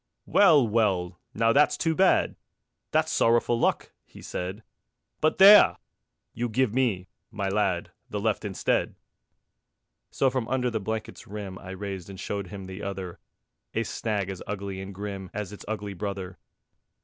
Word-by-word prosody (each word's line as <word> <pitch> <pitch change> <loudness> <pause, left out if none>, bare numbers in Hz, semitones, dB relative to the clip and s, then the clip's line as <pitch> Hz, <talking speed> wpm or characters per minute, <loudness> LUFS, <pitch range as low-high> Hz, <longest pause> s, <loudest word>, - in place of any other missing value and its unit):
"Well, 155 - +5
well. 95 -5 0 0.2
Now 115 +1 +3
that's 150 +2 +4
too 165 - +1
bad! 190 +3 +3 0.5
That's - - +1
sorrowful 115 0 +3
luck," - - 0
he - - -15
said; 95 +5 -5 0.6
"But 155 - +2
there! 200 +2 +9 0.6
You 120 +1 -2
give 120 0 +1
me, 115 -8 0 0.2
my 100 -3 -3
lad, 95 -3 0 0.2
The 105 - -3
left 110 0 0
instead." 100 -3 -1 1.1
So 135 - +1
from 125 -3 -2
under 125 -1 0
the 110 - -1
blanket's 110 +2 -5
rim 100 -2 -7
I 95 - -11
raised 95 -1 -6
and 95 -2 -9
showed 100 0 -4
him 95 +1 -8
the 95 +2 -8
other, 95 -3 -5 0.6
A - - +1
snag 100 -4 -2
as 95 - -8
ugly 100 -1 -4
and 95 +1 -7
grim 100 -1 -6
As 105 -1 -4
its 105 - -10
ugly 105 -2 -4
brother. 95 -1 -5
105 Hz, 155 wpm, -27 LUFS, 95-115 Hz, 1.1 s, there